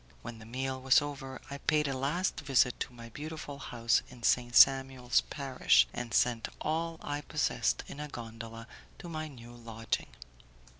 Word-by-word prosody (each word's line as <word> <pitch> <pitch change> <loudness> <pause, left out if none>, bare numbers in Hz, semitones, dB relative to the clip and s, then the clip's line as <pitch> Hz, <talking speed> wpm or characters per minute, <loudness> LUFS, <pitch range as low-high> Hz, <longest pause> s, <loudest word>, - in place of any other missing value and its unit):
When 115 -1 -7
the 110 - -12
meal 130 +2 -3
was 130 0 +6
over, 140 -3 -6
I 140 - -5
paid 150 0 +2
a 135 - -2
last 150 +9 -1
visit 130 -3 +2
to - - -3
my 115 -1 -10
beautiful 145 +1 -7
house 115 -3 +1
in 120 -2 -14
Saint 120 0 +2
Samuel's 135 -2 +5
parish, 130 - +3
and 120 -1 -5
sent 120 -1 +2
all 165 +1 -2
I 145 0 -3
possessed - - 0
in 140 - -9
a 150 - -4
gondola 115 -2 -8 0.3
to - - -9
my 155 -2 -4
new 120 -5 -12
lodging. 115 -1 -4
130 Hz, 165 wpm, -31 LUFS, 115-145 Hz, 0.3 s, was